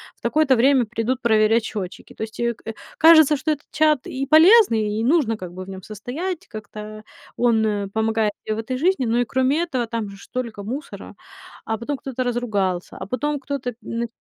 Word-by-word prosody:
"В - - -36
такое-то 305 -4 +3
время 255 +1 +4
придут 240 +3 -2
проверять 220 0 +3
счётчики". 200 -5 -7
То - - -5
есть, 220 +1 -8
э, 235 0 0
к - - -25
э, 225 - -3 0.2
кажется, 315 -2 +7
что 310 +3 -1
этот 290 - -4
чат 305 -3 +2
и 270 +1 -3
полезный, 310 - +6
и 225 - -1
нужно 250 -6 +2
как 180 -3 -8
бы 185 0 -7
в - - -12
нём 190 -1 -8
состоять, 310 - -5
как-то 215 0 -9 0.3
он, 235 -2 +3
э, 205 -2 -1
помогает 220 -1 +1
мне 215 - 0
в - - -7
этой 240 +3 -3
жизни. 330 -2 +1
Но 230 +1 +1
и 245 - +2
кроме 260 +6 +1
этого, 265 -8 -1
там 225 -3 -4
же 200 - -11
ж - - -14
столько 235 -5 -5
мусора, 260 +8 -7 0.5
а 225 - -2
потом 270 +6 -4
кто-то 260 -1 -4
разругался, 205 -7 -2
а - - -6
потом 285 +7 -2
кто-то 265 -3 -4
мн 230 0 -3
235 Hz, 205 wpm, -22 LUFS, 215-280 Hz, 0.5 s, кажется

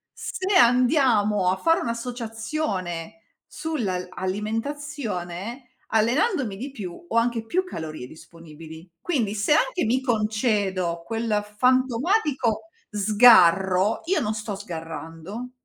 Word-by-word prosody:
se 380 +1 -2
andiamo 240 - +4
a 190 - -1
fare 330 +7 +2
un'associazione 225 - -4 0.3
sull'al 210 - -3
alimentazione, 225 0 -4 0.2
allenandomi 240 - +1
di 260 +7 -5
più, 205 - -8
ho 230 - 0
anche 230 -1 +1
più 370 +11 0
calorie 155 - -7
disponibili. 160 +2 -13
Quindi 235 -12 -1
se 210 +8 +2
anche 360 +5 +1
mi 250 +4 +1
concedo 210 -7 0
quel 225 -2 -1
fantomatico 255 - +1 0.2
sgarro, 200 -3 +5
io 360 -1 +1
non 210 -2 -1
sto 210 -1 -4
sgarrando, 165 +4 -7
220 Hz, 105 wpm, -24 LUFS, 185-255 Hz, 0.3 s, sgarro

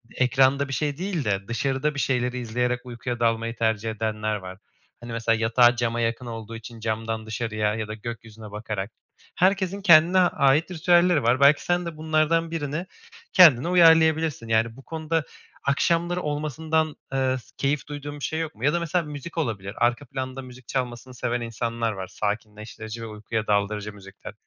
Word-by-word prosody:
ekranda 135 +2 +3
bir 135 - -5
şey 145 0 -1
değil 180 -6 -2
de 100 -2 -1
dışarıda 135 +5 -1
bir - - -3
şeyleri 125 -2 0
izleyerek 125 +1 -1
uykuya 120 0 -5
dalmayı 115 0 0
tercih 110 -1 0
edenler 110 -1 -2
var. 95 -1 -8 0.4
Hani, 120 0 -8
mesela 115 0 +1
yatağı 120 +2 +4
cama 120 -1 -1
yakın 115 +2 -1
olduğu 115 -1 -7
için 115 +1 -10
camdan 110 0 -3
dışarıya 110 -1 -1
ya 110 -1 -3
da 110 - -5
gökyüzüne 110 -1 -8
bakarak. 105 -1 -4 0.4
Herkesin 195 +1 +1
kendine 170 0 +6
ait 155 -1 +3
ritüelleri 175 -2 +3
var. 120 +2 +3
Belki 140 +1 +5
sen 175 0 +1
de 165 -2 -6
bunlardan 160 +1 +1
1'ini 155 +2 -3 0.5
kendine 160 -5 +7
uyarlayabilirsin, 160 -6 +4
yani, 115 0 +1
bu 135 - -14
konuda 160 -1 -2 0.4
akşamları 170 +5 +1
olmasından, 155 +1 -1 0.2
ııı, 130 -1 +1
s - - -20
keyif 140 +1 -1
duyduğun 145 0 -7
bir - - -9
şey 160 - -2
yok 160 -1 -4
mu? 110 - -11
Ya 150 - +3
da 170 - +1
mesela 170 0 -1
müzik 150 +3 -8
olabilir. 105 -9 -2
Arka 120 +4 +1
planda 130 +1 -5
müzik 125 -1 -13
çalmasını 125 -1 -4
seven 120 -1 -2
insanlar 115 0 -2
var. 95 -2 -6
Sakinleştirici 110 +1 -5
ve 115 - -5
uykuya 110 0 -4
daldırıcı 105 0 0
müzikler. 100 0 -11
125 Hz, 170 wpm, -25 LUFS, 115-155 Hz, 0.5 s, kendine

